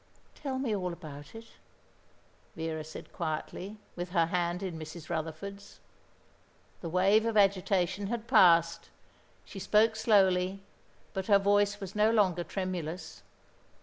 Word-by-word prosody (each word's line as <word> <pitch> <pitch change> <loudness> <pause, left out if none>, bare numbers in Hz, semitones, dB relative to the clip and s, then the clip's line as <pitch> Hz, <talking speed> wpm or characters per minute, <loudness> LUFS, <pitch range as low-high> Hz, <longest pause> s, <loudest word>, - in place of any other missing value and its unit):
"Tell 270 -3 -4
me 255 -5 -1
all 180 -3 -2
about 150 -1 -10
it," 225 0 -9 1.1
Vera 160 -1 -4
said 155 +1 -10
quietly, 175 +5 -4 0.2
with 175 0 -5
her 170 -3 +4
hand 175 +1 -1
in 175 -4 -4
Mrs. 155 0 -9
Rutherford's. 180 +6 -6 1.0
The 170 - -5
wave 195 +5 +4
of 225 -1 0
agitation 195 -1 +2
had 235 +1 -4
passed. 170 -7 +4 0.6
She 195 - -9
spoke 215 +4 +3
slowly, 195 -3 +2 0.5
but 190 -1 -3
her 205 -2 +6
voice 205 +1 +2
was 195 -1 -7
no 210 +1 +3
longer 190 -6 +2
tremulous. 180 -3 -5
190 Hz, 130 wpm, -30 LUFS, 170-205 Hz, 1.1 s, her